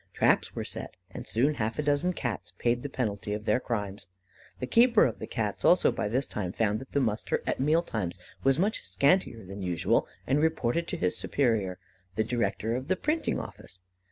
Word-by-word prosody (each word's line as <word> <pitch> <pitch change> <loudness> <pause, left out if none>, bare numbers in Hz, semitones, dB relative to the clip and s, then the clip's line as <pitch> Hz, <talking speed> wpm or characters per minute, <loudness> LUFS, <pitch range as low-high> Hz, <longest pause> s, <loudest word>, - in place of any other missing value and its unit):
Traps - - +3
were - - -2
set, - - -6 0.2
and - - -8
soon 135 +7 +2
half 115 -4 -2
a 150 - 0
dozen 145 +5 +2
Cats 95 - -4
paid 120 0 +1
the 145 - -4
penalty 105 -5 -2
of 105 +1 -4
their 125 - +3
crimes. 105 -6 -3 0.5
The 125 - -2
keeper 235 - +5
of 115 - -2
the - - -5
Cats, - - -2
also, - - +5
by - - -2
this 130 +6 +1
time, 95 -4 -4
found 110 -1 +1
that 135 - -12
the 140 - +3
muster 110 -5 0
at - - -1
meal 155 +5 +3
times 95 - -3 0.3
was 135 0 +4
much 205 +5 +1
scantier 115 - +2
than 95 +2 -7
usual, 90 -3 +1 0.2
and 140 +3 +2
reported 160 0 +1
to - - -3
his 90 0 0
superior, 110 -9 0 0.4
the 110 - +2
director 115 0 -1
of 130 +2 -4
the 185 - +2
printing 305 - 0
office. 95 - -9
120 Hz, 200 wpm, -29 LUFS, 105-145 Hz, 0.5 s, keeper